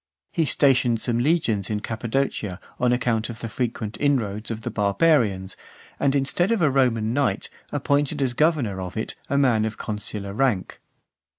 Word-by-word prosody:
He 165 - +1
stationed 130 -5 +3
some 120 0 0
legions 120 - +1
in 105 -1 -1
Cappadocia 110 -4 -2 0.2
on 125 -1 +3
account 120 -2 0
of 115 -2 -7
the 115 - -4
frequent 115 -1 -3
inroads 115 -7 0
of 115 -1 -4
the - - -4
barbarians, 105 - +2 0.4
and, 140 0 +2
instead 140 +7 +1
of 230 - +2
a 155 -5 +3
Roman 120 -4 +2
knight, 125 -8 0 0.2
appointed 145 +1 +1
as 130 -3 +1
governor 130 - +1
of 90 +3 -6
it 110 - -2 0.2
a 140 - +1
man 125 -6 +3
of 110 0 -3
consular 105 -1 -4
rank. 115 -5 0
120 Hz, 165 wpm, -24 LUFS, 110-140 Hz, 0.4 s, stationed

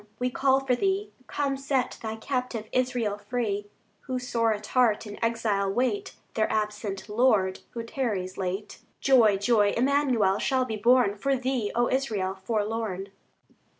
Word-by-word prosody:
we 250 +1 -1
call 270 +1 +3
for 255 - +2
Thee; 390 +7 0 0.2
Come, 280 -1 -1
set 270 -1 -1
Thy 220 -1 -4
captive 250 -1 -3
Israel 245 -5 0
free, 205 -2 -2 0.4
Who, 255 -1 -1
sore 230 -2 0
at 215 0 -3
heart, 230 -3 +2
in 205 +1 -7
exile 220 -4 +1
wait 260 - -1 0.2
Their 215 -1 +1
absent 210 -2 -2
Lord, 210 -4 +2 0.2
who 230 - -3
tarries 210 -7 -2
late. 190 +2 -4 0.2
Joy, 230 -7 +5
joy, 205 0 +3
Emmanuel 250 -7 +2
shall 260 -2 +1
be 225 -3 -3
born 235 -1 +4
For 275 +7 0
thee, 255 -4 -1
O 240 +1 +3
Israel, 215 -8 -1
forlorn. 205 -1 -2
230 Hz, 150 wpm, -27 LUFS, 205-255 Hz, 0.4 s, Joy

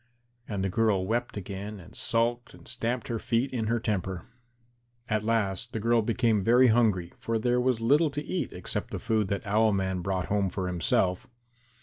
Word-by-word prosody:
And 100 -3 -3
the 95 - 0
girl 110 -4 +2
wept 115 +2 -2
again 100 +1 -6
and 90 +5 -14
sulked 120 +1 -1
and - - -16
stamped 120 0 -3
her 115 -2 -2
feet 120 +5 0
in 115 -3 -1
her 115 +1 +1
temper. 95 -5 -2 0.8
At 110 -2 0
last 115 0 -1
the 110 - -2
girl 115 +2 +3
became 115 -2 +1
very 125 +4 +5
hungry, 105 -7 +2
for 115 0 -1
there 120 +2 +1
was 125 -2 +1
little 145 +7 +4
to 145 +1 -5
eat 185 - -2
except 90 - -3
the - - -4
food 110 -3 0
that 100 0 -3
Owl 110 +1 +3
man 95 -1 -1
brought 95 0 -1
home 100 -2 0
for 95 +1 -3
himself. 90 +1 0
110 Hz, 190 wpm, -28 LUFS, 95-120 Hz, 0.8 s, very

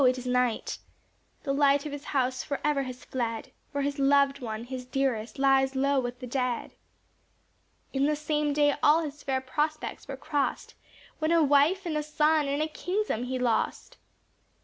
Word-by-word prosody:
it 255 0 +4
is 250 - -7
night; 250 -2 0 0.6
The 275 - -1
light 280 0 +3
of 300 - -4
his 290 0 -7
house 255 -2 0
forever 285 0 0
has 255 -1 -7
fled, 240 +1 -3 0.2
For 285 -1 -1
his 285 0 -2
loved 280 0 +4
one, 220 -3 -5
his 255 +1 -6
dearest, 250 -3 -1
lies 270 0 +3
low 275 +1 +2
with 245 -1 -4
the 255 - -6
dead. 250 -1 -2 1.2
In 275 +1 +2
the 300 - +2
same 300 0 0
day 290 0 +3
all 315 +3 +5
his 295 -1 -7
fair 265 -1 -1
prospects 300 +5 -3
were 270 -1 -5
crossed, 290 0 -2 0.5
When 310 +1 +1
a 335 -1 +5
wife, 295 +7 +3
and 325 -3 -2
a 300 - +1
son, 300 0 +2
and 285 +2 0
a - - -1
kingdom 360 - -2
he 255 +1 -2
lost. 245 -3 -1
275 Hz, 175 wpm, -28 LUFS, 255-295 Hz, 1.2 s, all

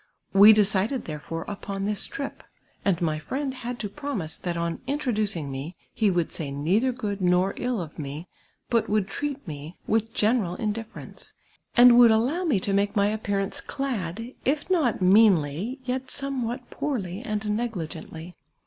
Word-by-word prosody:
We 200 +2 +10
decided 210 +4 +2
there 150 -2 -5
fore 165 +2 -5
upon 200 -1 -4
this 205 -1 +1
trip, 275 0 -6 0.4
and 190 -4 +2
my 155 -2 0
friend 265 - -3
had 245 -1 -5
to 210 - -2
promise 205 - -3
that 175 -2 -3
on 170 0 -2
introducing 215 - -1
me 140 +6 -6 0.2
he 215 -2 +2
would 175 -3 0
say 150 -4 -4
neither 180 - +1
good 210 -5 -4
nor 180 +2 +3
ill 245 -3 -1
of 160 -3 -7
me, 150 +4 -6 0.4
but 230 -2 +2
would 210 -2 +1
treat 280 +3 -4
mo 150 +1 -7
with 225 +1 +1
general 210 -5 +2
indifference, 225 +2 -5 0.4
and 245 0 +9
would 240 -1 +9
;illow 255 +12 +2
me 230 -11 +3
to 200 - -1
make 200 +1 +1
my 205 +1 +2
ajipcarancc 200 -2 -2
clad, 230 -3 -3
if 290 +6 0
not 285 - +2
meanly, 190 - +4
yet 260 +1 -2
somewliat 255 -3 -3
poorly 205 -9 -3
and 215 -4 -3
negligently. 175 -6 -5
210 Hz, 160 wpm, -26 LUFS, 180-245 Hz, 0.4 s, We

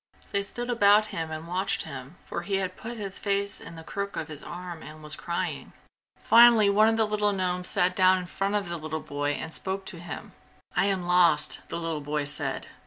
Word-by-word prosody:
They 200 - +1
stood 240 +5 -4
about 210 -2 +5
him 165 -1 -3
and 155 +1 -6
watched 185 +3 0
him, 140 0 -8
for - - -4
he 195 +3 -2
had 185 -1 -1
put 235 +1 -7
his 200 -3 -5
face 200 0 -1
in 165 - -9
the 160 - -9
crook 200 +4 -4
of 160 - -4
his 150 -2 -6
arm 175 -2 -7
and 155 0 -11
was 150 0 -3
crying. 170 +2 -4 0.5
Finally 230 -3 +7
one 215 +2 +5
of 225 - +1
the 220 - +3
little 210 -1 +1
gnomes 180 -1 -1
sat 180 +1 +2
down 185 0 +5
in 180 - -4
front 195 +3 -2
of 205 -3 0
the 170 0 -3
little 155 0 -4
boy 145 0 -2
and 160 +2 -5
spoke 190 0 -2
to 170 - -7
him. 175 +4 -7 0.4
"I 180 - +3
am 190 -2 0
lost!" 175 -4 +3
the - - -3
little 165 -2 -3
boy 145 0 -2
said. 145 -1 -3
180 Hz, 220 wpm, -27 LUFS, 160-200 Hz, 0.5 s, Finally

